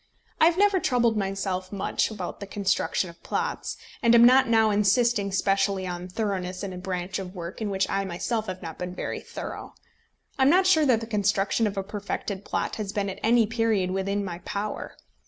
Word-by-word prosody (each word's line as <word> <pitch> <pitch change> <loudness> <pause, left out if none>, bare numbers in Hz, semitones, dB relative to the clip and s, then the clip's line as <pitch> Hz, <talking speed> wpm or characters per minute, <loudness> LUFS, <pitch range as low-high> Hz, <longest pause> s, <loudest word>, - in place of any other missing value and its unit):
I - - +6
have 340 +1 +3
never 400 -1 +4
troubled 240 -7 +2
myself 195 -2 -2
much 200 - 0
about 200 -5 -6
the 200 - -7
construction 200 -1 0
of 170 - -23
plots, - - -3 0.2
and 235 -2 +5
am 235 0 +8
not 260 +2 +6
now 220 -1 +4
insisting 205 0 +2
specially 195 0 +1
on 180 0 -5
thoroughness 185 -2 -3
in 195 -2 -4
a - - -7
branch 180 0 -3
of 190 0 -7
work 170 +4 -7
in 215 - -1
which 195 -1 0
I 195 0 0
myself 215 +5 -2
have 185 0 -6
not 165 -1 -7
been 180 0 -5
very - - -4
thorough. - - -8 0.6
I - - +1
am 265 - +6
not 370 +4 +5
sure 315 -5 +4
that 235 -4 +3
the - - -4
construction 210 0 +1
of 200 -1 -5
a 195 - -1
perfected 200 -1 -4
plot - - -2
has 210 -3 -3
been 200 -1 -1
at 190 - -9
any 230 0 +4
period 220 -4 0
within 195 +1 -1
my 175 -2 -5
power. 205 +3 -5
200 Hz, 205 wpm, -26 LUFS, 190-225 Hz, 0.6 s, am